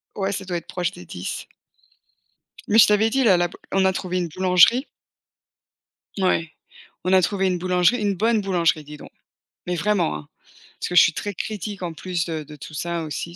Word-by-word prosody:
Ouais 195 -1 -1
ça 195 0 -4
doit 180 -2 -2
être 170 - -9
proche 175 -1 -2
des 90 - -12
10, 90 +1 -6 1.2
Mais 215 - +3
je 225 - +8
t'avais 210 +1 +3
dit 265 +4 +1
là 195 -6 +5
là 175 0 +2
b 175 - -17 0.2
on 195 0 +2
a 190 - +3
trouvé 185 0 -3
une 175 -1 -1
boulangerie 185 - +4 1.3
ouais, 175 -4 +1 0.5
on 185 +2 +1
a 190 - +6
trouvé 195 +1 0
une 180 -1 0
boulangerie, 180 +6 +2
une 200 -1 0
bonne 225 +3 +2
boulangerie 170 -5 +1
dis 150 +1 -10
donc - - -13 0.6
mais 180 - -1
vraiment, 180 - +1
hein, 75 -1 -9 0.5
parce - - -3
que 180 - -4
je - - +10
suis 165 - +4
très 205 +5 -4
critique 205 0 -5
en 175 -2 -4
plus, 175 0 -3
heu, 160 -2 -4
de 150 - -11
tout 150 +2 -10
ça 170 +2 -3
aussi, 165 +2 -5
180 Hz, 205 wpm, -23 LUFS, 170-200 Hz, 1.3 s, je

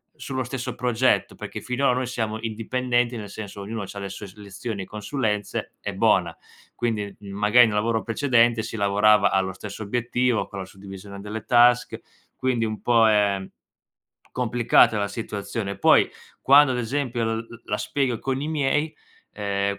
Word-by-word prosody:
sullo 130 -1 -4
stesso 125 +1 -5
progetto, 125 0 +1
perché - - -7
finora 125 +2 0
noi 130 0 -1
siamo 110 -3 -3
indipendenti, 120 +2 -1
nel 105 -2 -7
senso 100 -2 -8
ognuno 110 +2 -5
c'ha 100 - -10
le 100 0 -5
sue 100 +2 -8
s 95 - -15
lezioni 100 0 -6
e - - -9
consulenze, 105 0 -3
e - - -5
bona. - - +2 0.4
Quindi, 105 -4 -2
m 100 - -10
magari, 105 +4 +5
in 110 - -1
un 105 - -1
lavoro 115 +1 0
precedente 120 -2 +2
si 110 0 -6
lavorava 100 0 +4
allo 95 0 0
stesso 100 +3 -8
obiettivo 120 +2 0
con 100 - -8
la 95 - -5
suddivisione 100 +1 -11
delle 105 +2 -6
task, 120 0 +4 0.4
quindi 130 -3 0
un 110 -2 -3
po' 115 -2 +5
è 100 -2 +2 0.9
complicata 120 -3 +3
la 100 - 0
situazione. 100 -1 -5
Poi - - +5 0.4
quando, 140 -1 +6
ad - - -2
esempio, 125 -1 -2
l 110 0 -1
l 115 0 -11
la 105 - -2
spiego 130 -3 -1
con 135 -1 -2
i 145 - -3
miei, 150 0 0 0.4
ehm, 100 -1 -2
110 Hz, 170 wpm, -24 LUFS, 100-125 Hz, 0.9 s, quando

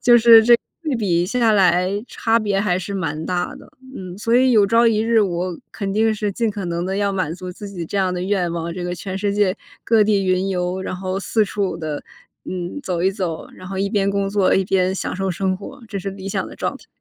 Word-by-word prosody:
就 240 -1 +7
是 230 -1 +8
这 240 +1 +7
个 - - -39 0.2
对 305 -4 -1
比 175 -6 +1
下 230 +3 +2
来 180 -3 +4 0.2
差 225 0 +1
别 205 -3 0
还 185 -3 +1
是 185 +2 -5
蛮 160 -4 -3
大 180 -1 -2
的。 - - -15 0.3
嗯， 185 -1 -7
所 230 +2 0
以 255 0 +4
有 215 -3 +6
朝 230 +3 +4
一 225 -2 +3
日 225 +1 +2
我 180 -3 -1
肯 195 -2 -3
定 220 +2 +2
是 210 -1 -2
尽 230 +3 0
可 200 -2 -5
能 170 0 -2
地 190 +1 -2
要 200 -1 0
满 185 -5 -1
足 180 0 -7
自 205 +3 -9
己 180 -4 -6
这 200 - -4
样 185 -2 +1
的 180 - -3
愿 185 -3 0
望， 170 0 -3
这 180 - -5
个 175 0 -2
全 185 +2 -5
世 200 0 0
界 205 -1 +2 0.3
各 225 -2 +4
地 200 -2 +2
云 185 +1 +1
游， 180 0 -1
然 190 - -4
后 185 +1 -3
四 215 +2 +1
处 195 -3 -2
地 155 -3 -5 0.4
嗯， 180 +8 -5
走 175 -6 -2
一 190 - +3
走， 185 -5 -4
然 185 - -11
后 195 - -5
一 200 +1 0
边 200 -2 +1
工 200 0 0
作 200 -2 +3
一 190 - +2
边 185 0 +1
享 - - -3
受 195 0 -1
生 185 +1 -1
活， 200 +5 -10
这 200 - -4
是 195 +1 -4
理 195 0 -7
想 - - -2
的 - - -10
状 - - -2
态。 - - -19
195 Hz, 270 characters per minute, -21 LUFS, 180-210 Hz, 0.4 s, 是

